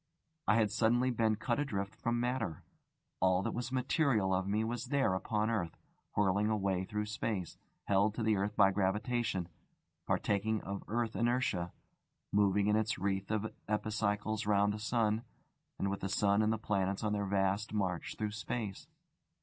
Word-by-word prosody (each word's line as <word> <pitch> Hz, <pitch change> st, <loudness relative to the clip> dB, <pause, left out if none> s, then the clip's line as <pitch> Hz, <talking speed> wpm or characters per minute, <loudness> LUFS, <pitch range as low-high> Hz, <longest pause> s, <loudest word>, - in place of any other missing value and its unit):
I -, -, +5 dB
had 110 Hz, -3 st, +3 dB
suddenly 120 Hz, +4 st, +3 dB
been 110 Hz, -2 st, +2 dB
cut 120 Hz, +5 st, -1 dB
adrift 100 Hz, -8 st, -2 dB
from 120 Hz, +2 st, -1 dB
matter: 120 Hz, -, -2 dB, 0.6 s
all 95 Hz, 0 st, +3 dB
that -, -, -2 dB
was 120 Hz, +1 st, -3 dB
material 125 Hz, -, +2 dB
of 95 Hz, +1 st, 0 dB
me 105 Hz, +2 st, +1 dB
was 115 Hz, +1 st, -3 dB
there 140 Hz, -9 st, +2 dB
upon 105 Hz, +4 st, 0 dB
earth, 85 Hz, -7 st, -2 dB, 0.4 s
whirling 100 Hz, +1 st, +2 dB
away 95 Hz, -3 st, 0 dB
through 105 Hz, +1 st, -2 dB
space, 105 Hz, -4 st, -3 dB, 0.3 s
held 100 Hz, +2 st, +2 dB
to 115 Hz, -, -2 dB
the 110 Hz, -1 st, +3 dB
earth 100 Hz, +2 st, -1 dB
by 100 Hz, -2 st, +6 dB
gravitation, 100 Hz, 0 st, 0 dB, 0.6 s
partaking 110 Hz, +2 st, +1 dB
of 100 Hz, 0 st, -4 dB
the -, -, -15 dB
earth 115 Hz, -2 st, 0 dB
inertia, 115 Hz, -6 st, +1 dB, 0.6 s
moving 100 Hz, 0 st, +3 dB
in 105 Hz, 0 st, +3 dB
its 110 Hz, 0 st, +1 dB
wreath 95 Hz, 0 st, -1 dB
of 110 Hz, 0 st, -1 dB
epicycles 105 Hz, 0 st, -1 dB
round 100 Hz, 0 st, +3 dB
the 105 Hz, -, -5 dB
sun, 110 Hz, 0 st, +1 dB, 0.5 s
and 100 Hz, -, 0 dB
with 100 Hz, -, -3 dB
the 95 Hz, -, -3 dB
sun 100 Hz, +1 st, +3 dB
and 110 Hz, 0 st, +2 dB
the 110 Hz, -, +1 dB
planets 100 Hz, -2 st, -1 dB
on 105 Hz, -1 st, +1 dB
their 100 Hz, -1 st, -1 dB
vast 100 Hz, +2 st, +1 dB
march 95 Hz, -5 st, -2 dB
through 105 Hz, -1 st, -2 dB
space. 110 Hz, -1 st, -4 dB
105 Hz, 170 wpm, -33 LUFS, 100-110 Hz, 0.6 s, by